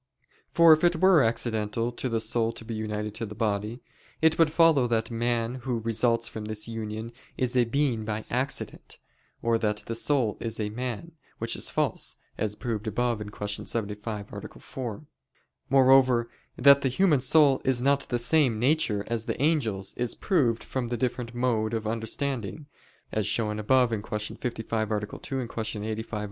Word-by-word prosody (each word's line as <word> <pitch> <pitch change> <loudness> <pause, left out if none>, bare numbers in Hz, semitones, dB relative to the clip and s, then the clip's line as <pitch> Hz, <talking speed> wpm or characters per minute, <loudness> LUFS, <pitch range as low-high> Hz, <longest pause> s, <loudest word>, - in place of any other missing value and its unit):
For 170 -1 +7
if 155 - +1
it 175 0 +4
were 185 -1 +5
accidental 115 -1 0
to 125 +2 -3
the 115 -1 0
soul 115 +1 0
to 115 - -7
be 115 - -5
united 105 -1 -3
to 115 +1 -4
the 105 - -9
body, 105 +2 -2 0.4
it 160 0 +3
would 165 -2 +5
follow 160 -6 +4
that 115 -1 -1
man 120 +1 -1
who 125 -1 -2
results 115 +1 +1
from 110 -1 -7
this 110 0 -3
union 110 0 -5 0.3
is 125 0 0
a 125 -1 +4
being 125 -2 0
by 110 0 -4
accident; 130 +3 -2 0.5
or 115 -1 +2
that 105 -1 -1
the 115 - -4
soul 115 -2 +1
is 115 -1 -4
a 105 -1 -1
man, 125 +7 -5 0.3
which - - -1
is - - -3
false, - - -1 0.2
as 105 -1 -2
proved 110 -2 -4
above 120 +1 0
(Q. 105 - -5 0.2
75, 105 -1 -4
A. - - -9
4). 125 +1 -6 0.6
Moreover, 130 -3 +5 0.3
that 140 +2 +7
the 135 - +1
human 155 +1 +3
soul 135 +1 +4
is 130 -2 +2
not 140 +2 +2
of - - -8
the 120 - +1
same 125 -1 +3
nature 120 -5 +2
as 115 -1 -2
the - - -3
angels, 115 -11 0
is 120 -1 -1
proved 130 - +1
from 130 -2 -3
the 120 0 -2
different 120 0 -3
mode 115 -3 0
of 110 -1 -3
understanding, 115 +2 -3 0.5
as 110 -2 -1
shown 105 0 -1
above 125 +3 +3
(Q. 105 -1 -3
55, 115 -2 -2
A. 105 - +1
2; 130 +4 -5
Q. 110 -2 -4
85, 110 +1 -5
A. 105 - -1
115 Hz, 180 wpm, -27 LUFS, 110-130 Hz, 0.6 s, For